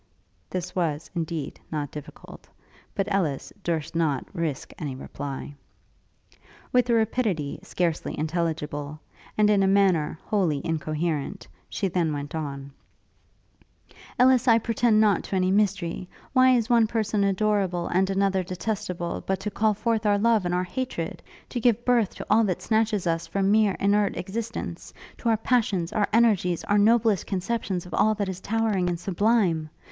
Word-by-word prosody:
This 180 0 -4
was, 160 -4 -1
indeed, 165 -4 -4
not 150 -3 -3
difficult; 150 +1 -11 0.5
but 195 - 0
Ellis 160 -9 -1
durst 165 -2 -2
not 155 -5 0
risk 165 -6 -3
any 140 -4 -4
reply. 140 +1 -6 1.2
With 250 -1 +3
a 235 - +4
rapidity 215 - 0
scarcely 170 -3 -2
intelligible, 155 -2 -2 0.4
and 210 -1 +5
in 205 -1 +4
a 195 - +3
manner 190 -6 +3
wholly 180 -9 +1
incoherent, 160 +2 -2 0.2
she 195 - -1
then 170 -4 0
went 145 0 -5
on: 140 -3 -5 1.5
'Ellis, 255 0 +4
I 230 -1 +7
pretend 230 -1 +2
not 210 -4 +3
to - - -3
any 185 0 +2
mystery. 190 -3 0 0.2
Why 255 -1 +6
is 230 -3 +1
one 235 -2 +4
person 215 -2 0
adorable, 195 -3 +1
and 190 +2 +1
another 195 -1 +1
detestable, 185 -1 -3
but 190 -1 0
to 210 +1 -3
call 215 +1 +1
forth 225 0 0
our 205 -1 +4
love 220 -3 +2
and 175 - 0
our 180 - +1
hatred? 180 -3 -4 0.3
to 245 - -3
give 235 0 +2
birth 235 -5 +2
to - - -7
all 220 +2 +4
that 185 -4 -2
snatches 220 -3 +1
us 165 -1 -1
from 195 +2 +1
mere 215 -2 +4
inert 205 0 +2
existence; 225 +5 -5 0.2
to 235 - 0
our 225 - +3
passions, 210 -7 0
our 210 -2 +2
energies, 205 -7 +3
our 205 0 +2
noblest 220 -1 +3
conceptions 195 -2 -2
of 180 - -10
all 215 0 +3
that 200 -2 -2
is 185 -1 -5
towering 210 -4 0
and 170 -1 -2
sublime? 185 -4 +1
195 Hz, 155 wpm, -25 LUFS, 165-215 Hz, 1.5 s, I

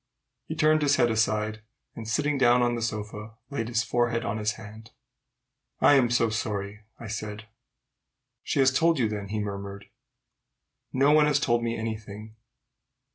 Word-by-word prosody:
He 160 - -4
turned 155 -1 +3
his 145 -1 +3
head 120 -2 +3
aside, 110 -1 0 0.3
and, 110 -2 -7
sitting 145 +4 0
down 120 -1 +5
on 120 0 +1
the 120 - -3
sofa, 110 0 -5 0.2
laid 115 -5 -2
his 115 -1 0
forehead 120 -1 0
on 110 +2 -2
his 105 0 0
hand. 110 +1 -12 0.9
"I'm 135 -4 +5
so 115 -2 +2
sorry!" 105 -1 -4
I - - -9
said. 105 0 -6 1.0
"She - - -3
has 130 0 +5
told 165 +3 +3
you, 120 -4 +2
then?" 105 -2 -5
he 105 +2 -4
murmured. 100 -1 -6 1.0
"No 135 +2 +3
one 150 0 +5
has 145 -1 +2
told 120 -4 +1
me 115 0 -2
any 110 0 -3
thing." 105 +1 -11
115 Hz, 165 wpm, -27 LUFS, 105-125 Hz, 1.0 s, down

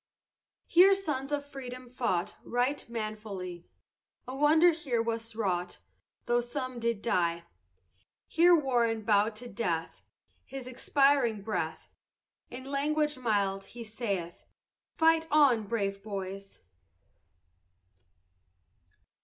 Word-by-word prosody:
Here 380 +3 +6
sons 295 -8 -3
of 290 -1 -1
freedom 255 -3 -8
fought 235 -8 -1
Right 245 +2 -1
manfully, 210 -6 -6 0.6
A 255 - -5
wonder 315 +5 +5
here 285 -8 -2
was 230 0 -3
wrought 180 -5 -2 0.5
Though 240 0 +2
some 255 0 -5
did 230 -3 -1
die. 170 -6 0 0.8
Here 345 +2 +5
WARREN 240 -7 +1
bow'd 210 0 +2
to 245 +3 -8
death, 170 -9 -3 0.4
His 270 -2 -8
last 255 - -8
expiring 260 -4 +2
breath, 215 +1 -3 0.6
In 250 +1 -8
language 295 +1 0
mild 200 -5 0
he 240 -1 -9
saith, 200 -6 -4 0.6
Fight 325 0 +4
on, 265 -8 +4
brave 200 -3 -2
boys. 195 -1 -6
235 Hz, 105 wpm, -30 LUFS, 205-275 Hz, 0.8 s, Here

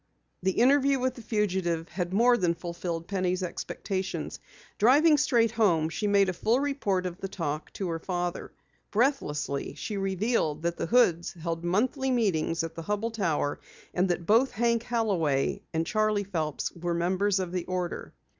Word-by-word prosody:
The 190 +1 +1
interview 275 +4 +4
with 255 0 0
the 245 - -11
fugitive 185 -7 -1
had 180 -2 -3
more 240 +5 +5
than 175 -6 +1
fulfilled 170 -1 -5
Penny's 185 -1 -1
expectations. 190 +2 -4 0.4
Driving 290 +8 +6
straight 240 -6 +3
home, 180 -9 +2
she 210 +5 -2
made 200 -1 +4
a 185 - 0
full 225 +8 +1
report 270 -10 0
of 180 0 -5
the 195 - -2
talk 155 -5 -4
to 195 - -3
her 165 -1 -2
father. 175 0 -3 0.4
Breathlessly, 205 - 0
she 210 - -4
revealed 195 -5 0
that 170 0 -1
the - - -2
Hoods 175 -8 +3
held 165 -1 -4
monthly 255 +10 +1
meetings 175 -9 +1
at 165 0 -5
the 165 - -7
Hubell 210 +6 -2
Tower, 165 -9 0 0.3
and 180 +1 +1
that 175 -1 -1
both 230 +8 +4
Hank 235 +1 +1
Holloway 190 - 0
and 160 0 0
Charley 215 +1 +1
Phelps 160 -7 -3
were 170 0 -3
members 190 +3 +1
of 185 -2 -3
the 180 -1 -2
order. 180 -1 -3
190 Hz, 165 wpm, -28 LUFS, 170-225 Hz, 0.4 s, Driving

